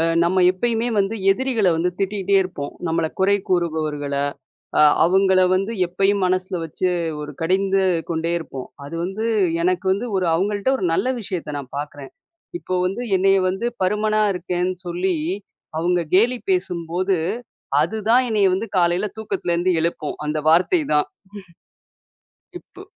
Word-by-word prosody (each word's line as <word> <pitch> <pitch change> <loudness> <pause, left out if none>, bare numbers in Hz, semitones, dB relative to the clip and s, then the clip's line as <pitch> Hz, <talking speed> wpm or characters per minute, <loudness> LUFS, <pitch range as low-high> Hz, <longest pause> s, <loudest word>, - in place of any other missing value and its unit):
அ - - +3 0.2
நம்ம 185 +2 +2
எப்பயுமே 230 +5 -1
வந்து 200 +2 +1 0.2
எதிரிகள 230 -2 +1
வந்து 175 +2 +1
திட்டிட்டே 200 0 0
இருப்போம். 175 -6 -6
நம்மள 165 0 0
குறை 195 +2 +4
கூறுபவர்கள, 155 -5 -1 0.7
அ - - +7 0.2
அவுங்கள 190 +2 +4
வந்து 195 +4 -1 0.2
எப்பயும் 195 +2 +1
மனசுல 185 0 -1
வச்சு, 180 +3 -1 0.3
ஒரு 150 0 -7
கடிந்து 195 +3 +2 0.3
கொண்டே 165 0 -1
இருப்போம். 135 -5 -8 0.2
அது 145 - -7
வந்து, 195 +5 -3 0.4
எனக்கு 180 +1 0
வந்து 205 +6 -1
ஒரு 185 -2 0
அவங்கள்ட்ட 205 +7 0
ஒரு 190 - -2
நல்ல 230 - +1
விஷயத்த 170 -7 -4
நான் 135 -2 -11
பார்க்குறேன். 145 -1 -7 0.5
இப்போ 185 - -4
வந்து 195 +6 -2 0.2
என்னைய 195 +1 +4
வந்து 190 +5 -3 0.2
பருமனா 215 +3 +1
இருக்கேன்னு 180 0 -2
சொல்லி, 180 +1 0 0.6
அவுங்க 175 +2 +1
கேலி 235 +7 +4
பேசும்போது, 180 - -1 0.7
அதுதான் 220 +8 +2
என்னைய 210 -3 +3
வந்து 200 +5 -2
காலைல 175 +3 +2
தூக்கத்துலருந்து 185 -4 -1
எழுப்பும், 165 -2 -2
அந்த 150 +1 -1
வார்த்தை 185 - +4
தான். 150 0 +3 1.3
ம்ஹ்ம். 360 - -13
இப்பு - - -16
185 Hz, 140 wpm, -21 LUFS, 170-200 Hz, 1.3 s, அ